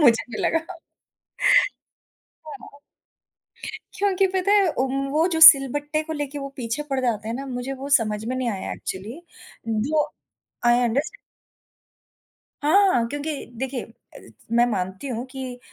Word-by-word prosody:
मुझे 235 -6 +5
भी 215 - -5
लगा। 330 +2 -1 1.7
हाँ। 285 -1 -11 1.2
क्योंकि 390 -1 +2
पता 375 +2 +2
है 405 -2 +5
उन्ह 270 +1 -1
वो 310 +4 +2
जो 320 - 0
सिलबट्टे 290 0 +7
को 320 - -5
लेके 290 -1 -4
वो 275 0 -5
पीछे 245 +3 -3
पड़ 270 - 0
जाते 220 -4 -1
हैं 230 - -3
ना, 275 +2 -5
मुझे 250 0 -4
वो 270 +1 -7
समझ 215 -2 -3
में 250 +3 -3
नहीं 255 -2 -1
आया 195 -3 -5
एक्चुअली। 210 - -7 0.5
जो 275 +8 +1 0.6
आई 240 +1 +4
अंडरस्टैंड। 280 - -1 1.5
हाँ, 380 +6 +4
हाँ, 230 -1 +2
क्योंकि 290 +3 -4 0.2
देखिए 260 -1 -3
अ, 230 - -18 0.3
मैं 235 +1 +5
मानती 190 +4 -3
हूँ 240 -1 -4
कि 260 -2 -7
270 Hz, 145 wpm, -23 LUFS, 235-305 Hz, 1.7 s, सिलबट्टे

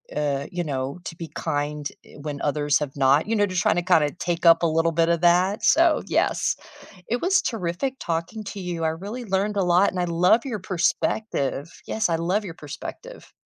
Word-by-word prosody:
uh, 145 -1 -1
you 175 -1 -2
know, 140 +1 -3
to 165 - -6
be 165 -1 -7
kind, 145 -1 -2 0.2
eh, - - -16
when 145 -1 -5
others 145 0 +1
have 145 -2 -4
not, 140 +6 +3
you 225 - 0
know? 205 -1 +3
Just 185 -2 -1
trying - - +2
to, - - +2
kinda 160 -5 +3
take 175 0 -2
up 165 +1 +7
a - - +5
little 165 +1 +2
bit 165 +1 +2
of 170 0 +1
that, 180 +4 +3
so 330 0 +4
yes, - - +1 0.5
it 240 +1 -1
was 370 +1 +3
terrific 225 +5 -2
talking 170 +6 -3
to 200 0 -6
you 175 -3 -4
I 160 - +2
really 200 +10 -6
learned 200 +1 0
a 195 - +2
lot 180 +3 +4
and 185 - -4
I 175 - +1
love 180 +8 +3
your 225 -6 -3
perspective 175 -4 -1 0.2
yes, 220 -4 0
I 165 - +2
love 185 +6 0
your 170 - -6
perspective. 170 - -9
175 Hz, 210 wpm, -24 LUFS, 155-200 Hz, 0.5 s, up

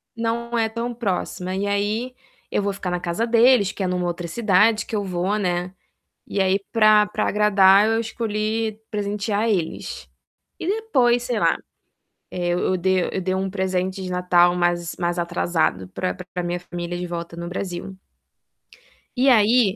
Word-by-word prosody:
Não 235 +1 -2
é 225 -1 +2
tão 235 +2 -4
próxima 185 -4 -3
e 200 +1 -1
aí, 210 +5 -1 0.4
eu - - +1
vou 200 0 -1
ficar 190 -2 -4
na 180 - -1
casa 175 +6 -1
deles 230 -3 +5
que 195 - -5
é - - 0
numa 180 -1 -1
outra 175 0 -4
cidade 210 +2 +3
que 220 - -5
eu 205 - 0
vou, 185 +2 -1
né, 180 -2 -2 0.5
e 200 - -2
aí 190 +1 +2
pra 215 -2 +5
pra 215 +1 -2
agradar 200 -1 +5
eu 225 0 +1
escolhi 220 -1 -2
presentear 210 +1 -1
eles. 180 -7 -3 0.5
E - - -5
depois 265 - +2
sei 245 -3 -1
lá, - - +3 0.7
eh, 175 -1 -3
eu 185 +1 +1
de 185 0 0
eu 190 - -1
dei 185 +1 -1
um 190 0 -2
presente 190 0 -2
de 185 - -5
Natal 180 -1 +3
mais 175 -1 0
mais 175 0 -1
atrasado 170 - 0
pra 90 0 -3
pra 180 - -6
minha 175 +1 -2
família 175 0 -5
de 180 - -4
volta 170 -1 -6
no 170 0 -5
Brasil. 185 +1 -5 1.2
E 255 - +2
aí 230 +4 +4
195 Hz, 170 wpm, -22 LUFS, 180-220 Hz, 1.2 s, deles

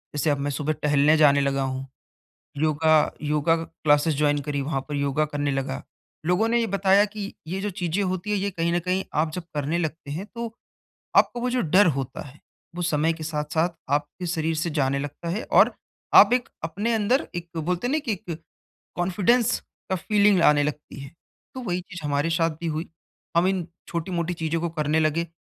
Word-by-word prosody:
जैसे 150 +2 +1
अब 145 - +2
मैं 145 +1 -1
सुबह 150 +2 -1
टहलने 150 0 +3
जाने 145 -2 +5
लगा 140 0 0
हूँ। 130 0 -4 0.7
योगा 155 +1 +3
योगा 150 +2 +2
क्लासेस 150 0 +2
जॉइन 145 0 +2
करी, 145 0 -3
वहाँ 135 -1 -2
पर 150 - -4
योगा 140 +1 +1
करने 145 -1 -2
लगा। 135 - -3 0.4
लोगों 180 +6 +2
ने 235 +1 +2
ये 230 - +1
बताया 200 0 +4
की 210 -1 -6
ये 185 +4 -3
जो 205 +1 -2
चीज़ें 180 0 -1
होती 185 +2 -2
हैं 205 - +2
ये 200 +1 -1
कहीं 170 -2 -1
न 175 - +2
कहीं 185 +2 -1
आप 155 +1 +1
जब 180 - -4
करने 150 +3 -1
लगते 160 -3 -4
हैं, 170 +8 -4
तो 235 -1 -5 0.6
आपको 240 - +3
वो 250 - 0
जो 250 0 +1
डर 185 +5 +5
होता 135 -1 -4
है, 140 +3 -15 0.4
वो 175 - -3
समय 160 -1 +1
के 160 -1 -8
साथ-साथ 155 +2 0 0.2
आपके 145 +5 -2
शरीर 165 -1 -1
से 165 +2 -1
जाने 140 -3 0
लगता 145 +4 -5
है 195 +7 -2
और - - +6 0.4
आप - - +9
एक 250 -1 0
अपने 200 +9 -1
अंदर 225 +5 +1
एक 175 -1 -5
बोलते 180 +7 -1
हैं - - -1
ना 310 - +2
कि 255 -6 -3
एक 175 -5 -7 0.6
कॉन्फिडेंस 195 +7 +2 0.3
का 190 - +1
फ़ीलिंग 200 0 +3
आने 145 -1 +5
लगती 150 -1 -5
है, 140 0 -9 0.4
तो 260 - -6
वही 180 -5 -2
चीज़ 175 -2 -10
हमारे 145 +2 0
साथ 165 -1 0
भी 170 - -2
हुई 155 +2 -3 0.5
हम 175 - +4
इन 185 -3 -1 0.2
छोटी-मोटी 170 0 -2
चीज़ों 165 0 -2
को 170 - -1
करने 155 -1 0
लगे, 160 +2 +1
165 Hz, 200 wpm, -25 LUFS, 150-185 Hz, 0.7 s, आप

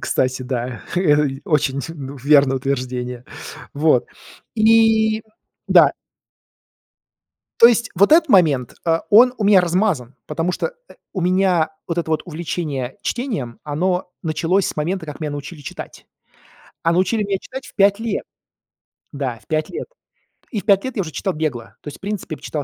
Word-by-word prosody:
Кстати, 130 0 0
да. 125 -2 -4 0.6
Очень, 140 -3 +1
ну, 145 -4 -7
верное 140 0 +4
утверждение. 125 -2 -3 0.5
Вот. 145 -4 +3 0.5
И 220 0 +4 0.5
Да. - - +6 1.7
То 230 - +11
есть 235 -1 +1
вот 200 - +4
этот 320 -1 +6
момент, 150 - +3
э, 165 0 +2
он 245 +4 +7
у 215 - -1
меня 200 -2 +6
размазан, 175 - 0
потому 165 +4 -1
что, 485 - -3
э, - - -15 0.2
у 190 - -3
меня 180 -2 +2 0.2
вот 170 0 -2
это 165 -1 -2
вот 155 - 0
увлечение 155 -6 -4
чтением, 215 - -3
оно 180 +5 -1
началось 165 +4 +1
с - - -4
момента, 165 +3 -2
как 150 0 -8
меня 155 -2 -3
научили 145 +2 -7
читать. 135 - -9 0.8
А 165 - +2
научили 190 +5 +1
меня 200 -1 -1
читать 265 +1 -8
в - - -15
5 200 0 +4
лет. 225 -3 -2 0.9
Да, 135 -5 -4
в - - -27
5 155 0 -1
лет. - - -6 0.6
И 215 - -2
в - - -28
5 200 -2 +4
лет 260 - -4
я - - +2
уже 165 -4 -5
читал 185 +7 -2
бегло. 145 -8 -4
То - - -14
есть, 145 - -7
в - - -41
принципе, 200 -5 -4
б - - -18
читал 150 -2 -4
165 Hz, 165 wpm, -20 LUFS, 140-200 Hz, 1.7 s, То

